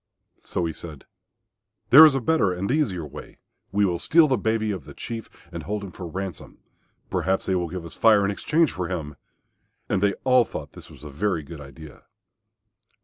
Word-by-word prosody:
So 90 - -3
he 80 - -3
said, 75 -5 -10 0.9
"There 155 +5 +11
is 145 - +1
a 135 - 0
better 115 - +2
and 90 +4 -2
easier 110 - 0
way. 75 +1 -11 0.3
We 100 +1 +2
will 85 -3 -1
steal 165 -1 +5
the 135 - +2
baby 110 0 0
of 90 -8 -6
the - - -12
Chief 115 -2 -7 0.2
and - - -6
hold 105 0 -4
him 100 - -8
for 90 -1 -8
ransom. 95 +1 -7 0.5
Perhaps 95 0 0
they 95 - 0
will 90 -2 -1
give 90 0 -6
us 85 - -9
Fire 105 -3 +4
in 100 - 0
exchange 155 +9 +1
for 90 -2 -4
him," 80 -5 -5 0.7
and 95 - 0
they 100 -1 +2
all 130 -1 +5
thought - - -8
this - - -12
was - - -15
a 75 - -8
very 85 +2 -1
good 75 +1 -10
idea. 70 +2 -13
95 Hz, 200 wpm, -24 LUFS, 85-110 Hz, 0.9 s, There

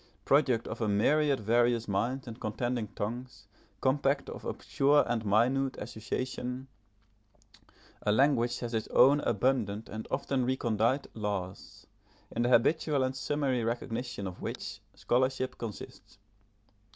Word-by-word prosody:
Product 130 -5 +3
of 115 - -6
a 110 - +1
myriad 140 +8 +3
various 120 +1 +2
minds 125 +7 -1
and 115 0 -8
contending 115 +1 -2
tongues, 120 0 -5 0.4
compact 140 +1 +1
of - - -8
obscure 145 +2 +2
and 120 -2 -1
minute 125 +6 +2
association, 125 +3 -4 1.3
a 105 - +1
language 120 0 +3
has 120 -1 -4
its 110 -1 -1
own 140 +4 +6
abundant 115 -4 0
and 110 0 -6
often 135 -2 0
recondite 120 0 +1
laws, 100 -4 -5 0.5
in 115 - -2
the 120 - +2
habitual 140 +3 +3
and 130 0 -1
summary 135 -3 0
recognition 115 -1 -3
of 90 -1 -7
which - - -5 0.2
scholarship 130 +1 0
consists. 110 -5 -8
120 Hz, 125 wpm, -30 LUFS, 110-130 Hz, 1.3 s, own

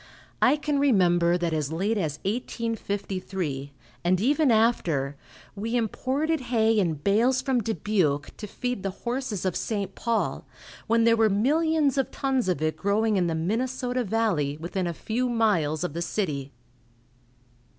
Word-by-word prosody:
I 260 - +5
can 295 -1 -1
remember 175 -10 +3
that 170 -2 -1
as 155 -2 -1
late 195 +7 0
as 155 -8 -2
1853, 195 - -3 0.3
and 180 +1 +2
even 285 +6 +3
after, 175 - +2 0.4
we 225 +4 -3
imported 270 +7 0
hay 225 -3 +2
in 170 -5 +1
bales 220 - +2
from 260 -3 +1
Dubuque 190 -10 0
to 210 - -6
feed 245 +1 -3
the 195 - -2 0.2
horses 240 -5 -2
of 185 - 0
St. 205 -3 -2
Paul, 230 -1 -1 0.4
when 230 0 +3
there 230 0 +5
were 225 -1 +3
millions 290 +6 +2
of 270 - 0
tons 265 -6 -1
of 155 -4 0
it 155 0 0
growing 210 +2 +1
in 180 -3 +2
the 165 - -1
Minnesota 245 +8 -1
valley, 190 -10 0
within 175 +3 -3
a 170 - -2
few 245 +7 -1
miles 180 -10 +1
of 180 - -3
the 170 - -3
city. 150 -8 -2
215 Hz, 150 wpm, -26 LUFS, 175-245 Hz, 0.4 s, I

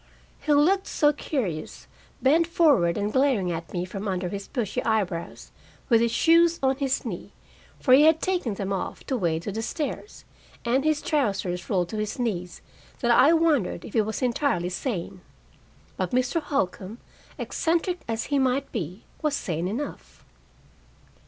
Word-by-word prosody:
He 305 - -2
looked 355 +7 +4
so 295 0 +3
curious, 205 - -4 0.4
bent 320 +5 +4
forward 285 - +3
and 205 +1 -2
glaring 260 -10 +2
at 165 0 -5
me 175 -1 -2
from 195 +2 -6
under 185 -2 -2
his 200 +1 -6
bushy 240 -8 -2
eyebrows, 195 -7 -2 0.4
with 230 -2 +5
his 235 -1 +2
shoes 335 +6 +4
on 265 0 +2
his 270 -2 -1
knee - - -6 0.5
for 255 - +4
he 285 +4 +8
had 320 0 +5
taken 355 - -1
them 195 0 -3
off 190 - -4
to 265 - -1
wade 170 -7 0
to 205 - -3
the 220 +3 -3
stairs 300 - -5 0.4
and 255 +3 +2
his 310 -1 +1
trousers 195 - -1
rolled 180 -3 +1
to 220 - -5
his 215 +4 -3
knees, 180 -8 -3 0.4
that 240 -2 +2
I 255 +6 +6
wondered 305 - +1
if - - -10
he 225 - +4
was 220 +4 -3
entirely 240 - 0
sane. 185 -2 -4 0.8
But 185 -2 -1
Mr. 255 +6 +1
Holcombe, 210 -7 -2 0.4
eccentric 345 +2 -1
as 225 -1 -2
he 285 -1 0
might 265 +1 0
be, 185 - -5 0.2
was 300 -2 +1
sane 170 - -2
enough. 245 +10 -6
235 Hz, 165 wpm, -25 LUFS, 190-290 Hz, 0.8 s, he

